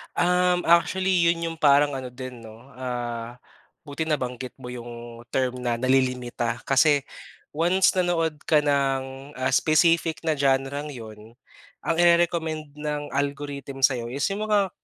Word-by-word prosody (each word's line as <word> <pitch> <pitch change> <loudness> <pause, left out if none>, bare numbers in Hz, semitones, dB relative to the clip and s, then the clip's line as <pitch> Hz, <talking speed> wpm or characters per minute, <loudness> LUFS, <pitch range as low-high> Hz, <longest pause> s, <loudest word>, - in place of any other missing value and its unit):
Um, 180 0 +2
actually 180 +1 +3
yun 170 0 +2
yung 165 - -8
parang 145 -1 +5
ano 130 - -6
din 130 -1 -8
'no, 115 +3 -13
ah, 120 -2 -4 0.5
buti 155 0 -4
nabanggit 130 -5 -3
mo 125 - -7
yung 120 -1 -9
term 130 -1 0
na 125 -1 -1
nalilimita. 125 -1 0
Kasi 140 +1 +4 0.5
once 175 +5 +2
nanood 165 -4 +1
ka 155 -2 +4
ng, 135 -1 -1
ah, 130 -1 -1
specific 165 0 +2
na 160 -2 0
genre'ng 140 +2 0
yun, 110 -2 -11 0.5
ang 165 - -1
ire-recommend 165 -3 +2
ng 150 -1 -4
algorithm 140 -1 -4
sa'yo 130 -3 +3
is 130 +4 -5
yung 205 +2 -3
mga 205 -3 +2
140 Hz, 135 wpm, -25 LUFS, 125-165 Hz, 0.5 s, parang